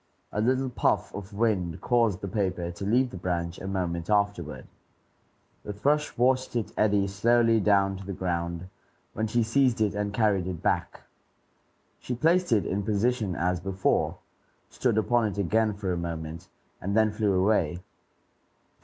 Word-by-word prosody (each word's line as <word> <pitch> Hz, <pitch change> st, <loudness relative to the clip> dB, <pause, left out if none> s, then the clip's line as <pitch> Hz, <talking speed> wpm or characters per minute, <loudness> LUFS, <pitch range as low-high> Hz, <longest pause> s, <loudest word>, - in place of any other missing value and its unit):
A 105 Hz, -, -1 dB
little 130 Hz, +3 st, +1 dB
puff 115 Hz, -, 0 dB
of 100 Hz, 0 st, -7 dB
wind 100 Hz, -6 st, 0 dB
caused 115 Hz, -6 st, +1 dB
the 100 Hz, -, -4 dB
paper 95 Hz, -3 st, -2 dB
to 95 Hz, +3 st, -7 dB
leave 125 Hz, +4 st, +2 dB
the -, -, -7 dB
branch 85 Hz, -1 st, -3 dB
a 95 Hz, -, -6 dB
moment 85 Hz, -3 st, -2 dB
afterward. 100 Hz, -7 st, 0 dB, 1.0 s
The 105 Hz, -, -6 dB
thrush 145 Hz, +9 st, 0 dB
watched 130 Hz, +1 st, +2 dB
it 115 Hz, -3 st, -1 dB
eddy 105 Hz, -2 st, +2 dB
slowly 115 Hz, +3 st, +3 dB
down 100 Hz, -2 st, +2 dB
to 95 Hz, -, -9 dB
the -, -, -3 dB
ground, 85 Hz, -1 st, -3 dB, 0.5 s
when 110 Hz, +1 st, -1 dB
she 120 Hz, +2 st, +1 dB
seized 125 Hz, +1 st, +2 dB
it 105 Hz, -2 st, +1 dB
and 105 Hz, 0 st, -2 dB
carried 105 Hz, -4 st, +1 dB
it 90 Hz, -3 st, -5 dB
back. -, -, -1 dB, 1.0 s
She 125 Hz, -, -4 dB
placed 170 Hz, +5 st, +2 dB
it 105 Hz, -3 st, +3 dB
in 100 Hz, +2 st, -1 dB
position 105 Hz, -1 st, 0 dB
as 90 Hz, +1 st, 0 dB
before, 95 Hz, +1 st, 0 dB, 0.5 s
stood 120 Hz, -4 st, 0 dB
upon 115 Hz, +1 st, +2 dB
it 105 Hz, -, -5 dB
again 110 Hz, +3 st, +2 dB
for 100 Hz, -3 st, -2 dB
a -, -, -2 dB
moment, 85 Hz, 0 st, -5 dB, 0.3 s
and 100 Hz, +3 st, -1 dB
then 110 Hz, -1 st, +4 dB
flew 105 Hz, -2 st, 0 dB
away. 95 Hz, -4 st, +1 dB
100 Hz, 160 wpm, -27 LUFS, 90-115 Hz, 1.0 s, then